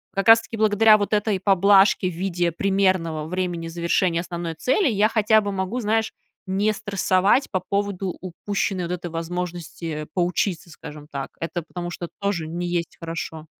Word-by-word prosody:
как 195 +2 +1
раз 225 0 +9
таки 225 - -8
благодаря 215 0 +5
вот 205 +1 -2
этой 210 -2 +1
поблажке 195 0 +4
в - - -7
виде 175 -1 -1
примерного 185 -4 +1
времени 175 -1 -3
завершения 170 +1 0
основной 170 -2 -5
цели, 270 - +1
я 215 -2 +3
хотя 220 -1 +4
бы 205 -1 -3
могу, 190 +5 -2
знаешь, 220 +1 0 0.3
не 200 +3 +1
стрессовать 200 +3 +1
по 190 - +1
поводу 195 -1 -2
упущенной 190 +1 -2
вот 175 - -3
этой 175 -1 -5
возможности, 175 0 -5 0.2
э, - - -8
поучиться, 180 -1 -1
скажем 150 -1 -10
так. 140 -3 -5
Это 170 +1 -3
потому 175 +2 -6
что 175 - -5
тоже 200 -6 -1
не 175 +2 -4
есть 175 -1 -3
хорошо. 165 -1 -6
185 Hz, 170 wpm, -23 LUFS, 170-205 Hz, 0.3 s, раз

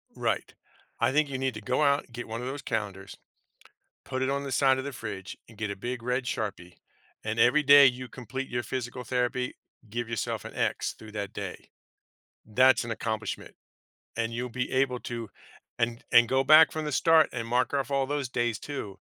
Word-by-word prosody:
Right. - - -1 0.5
I 115 +3 +3
think 150 0 +2
you 130 - -3
need 130 -1 -1
to 110 - -6
go 125 +7 0
out 140 -1 +3
and 120 - -23
get 120 - -6
one 115 +1 -5
of 125 - -4
those 140 +2 -4
calendars, 100 -4 -4 0.9
put 130 0 -3
it 130 - +1
on 140 0 -1
the 135 - -4
side 130 +1 +4
of 130 - -3
the 140 - -4
fridge 110 -6 -6
and 115 -3 -16
get 105 -2 -2
a 100 - -4
big 120 +3 -4
red 125 +2 -1
Sharpie, 100 -7 -4 0.5
and 110 +1 -2
every 125 +7 +5
day 140 0 +9
you 130 0 -1
complete 130 +3 -6
your 120 0 -2
physical 125 0 -4
therapy, 125 +1 -1 0.3
give 120 +2 -3
yourself 115 -2 -3
an - - -8
X - - -1
through 110 -1 -12
that 100 -2 -4
day. - - -7 0.8
That's 130 +4 +4
an 115 - -5
accomplishment, 110 -2 -4 0.6
and 115 0 -1
you'll 125 +2 -3
be 125 +1 -3
able 130 -1 +1
to 115 -3 -5 0.5
and 115 -1 -1
and 120 0 +7
go 135 0 +3
back 155 +3 +8
from 155 -1 -3
the 150 - -2
start 160 +1 +5
and 115 -2 -3
mark 125 +3 +1
off 140 0 -1
all 135 -1 +2
those 140 -2 -2
days 120 -3 -1
too 120 -9 -6
125 Hz, 205 wpm, -28 LUFS, 115-135 Hz, 0.9 s, day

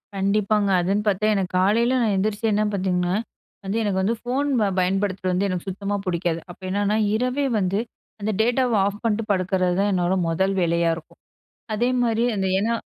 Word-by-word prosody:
கண்டிப்பாங்க. 200 +1 +1
அதுன்னு 195 +4 0
பார்த்தா 205 +1 +1
எனக்கு 190 -2 -1
காலையில 230 +7 +3
நான் 220 -3 +2
எந்திரிச்சு 210 +3 -1
என்ன 210 - +2
பார்த்தீங்கன்னா, 180 -1 0 0.5
வந்து 195 +3 -1
எனக்கு 200 -3 0
வந்து 225 +5 +1
ஃபோன் 265 +4 -1
ப 205 - +2
பயன்படுத்துறது 185 0 0
வந்து 190 +3 +1
எனக்கு 185 +1 -4
சுத்தமா 200 +2 -3
பிடிக்காது. 170 -2 -1
அப்ப 175 - -12
என்னன்னா, 205 +2 +1 0.2
இரவே 255 +4 0
வந்து 195 +2 0 0.4
அந்த 215 +1 -1
டேட்டாவ 245 +1 +1
ஆஃப் 205 +1 -3
பண்ணிட்டு 225 -1 0
படுக்கறதுதான் 185 +1 +1
என்னோட 180 0 +1 0.2
முதல் 190 +4 +1
வேலையா 170 0 +2
இருக்கும். 165 - -15 0.5
அதேமாரி 240 0 +1
அந்த 190 -1 0
ஏன்னா 230 +3 0
200 Hz, 165 wpm, -23 LUFS, 185-220 Hz, 0.5 s, காலையில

